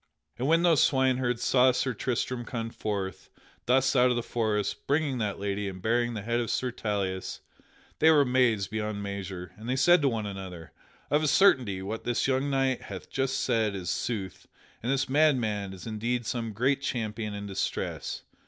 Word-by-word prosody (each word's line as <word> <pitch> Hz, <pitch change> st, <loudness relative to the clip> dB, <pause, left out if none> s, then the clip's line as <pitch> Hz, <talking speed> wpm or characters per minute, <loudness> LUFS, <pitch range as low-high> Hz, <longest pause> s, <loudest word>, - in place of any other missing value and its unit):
But 120 Hz, +4 st, -3 dB
when 165 Hz, +3 st, +3 dB
those 165 Hz, -5 st, +5 dB
swineherds 130 Hz, -3 st, +2 dB
saw 130 Hz, 0 st, +5 dB
Sir 125 Hz, +1 st, -1 dB
Tristram 125 Hz, +2 st, -2 dB
come 115 Hz, -1 st, -4 dB
forth 100 Hz, -5 st, -4 dB, 0.4 s
thus 130 Hz, +2 st, +3 dB
out 125 Hz, 0 st, +5 dB
of 125 Hz, -, +1 dB
the 120 Hz, -, -1 dB
forest 110 Hz, -4 st, -1 dB
bringing 145 Hz, -3 st, +1 dB
that 105 Hz, -3 st, -1 dB
lady 100 Hz, 0 st, -2 dB
and 95 Hz, -1 st, -8 dB
bearing 120 Hz, +4 st, 0 dB
the 105 Hz, -, -5 dB
head 120 Hz, +2 st, 0 dB
of 115 Hz, -3 st, -2 dB
Sir 130 Hz, -1 st, -1 dB
Tauleas, 100 Hz, -5 st, -3 dB, 0.6 s
they 160 Hz, -, +6 dB
were 155 Hz, -2 st, +6 dB
amazed 125 Hz, -7 st, +2 dB
beyond 105 Hz, -1 st, -3 dB
measure, 95 Hz, -2 st, -5 dB
and 110 Hz, +3 st, -8 dB
they 130 Hz, -, +1 dB
said 175 Hz, +5 st, +5 dB
to 140 Hz, -, +3 dB
one 110 Hz, -3 st, -2 dB
another: 95 Hz, -5 st, -7 dB, 0.4 s
"Of 150 Hz, +1 st, +3 dB
a 155 Hz, -, +1 dB
certainty 125 Hz, -, +4 dB
what 110 Hz, +4 st, -4 dB
this 120 Hz, -1 st, 0 dB
young 135 Hz, +1 st, +1 dB
knight 135 Hz, -2 st, +1 dB
hath 95 Hz, -2 st, -9 dB
just 135 Hz, 0 st, 0 dB
said 110 Hz, -5 st, +1 dB
is 90 Hz, -2 st, -3 dB
sooth 100 Hz, -6 st, -4 dB, 0.3 s
and 120 Hz, -, -1 dB
this 135 Hz, -1 st, +1 dB
madman 125 Hz, -9 st, +2 dB
is 95 Hz, -2 st, -10 dB
indeed 115 Hz, +2 st, -2 dB
some 115 Hz, -1 st, -2 dB
great 130 Hz, +6 st, +1 dB
champion 110 Hz, -5 st, -3 dB
in 100 Hz, 0 st, -5 dB
distress. 100 Hz, -1 st, -3 dB
115 Hz, 185 wpm, -28 LUFS, 100-130 Hz, 0.6 s, they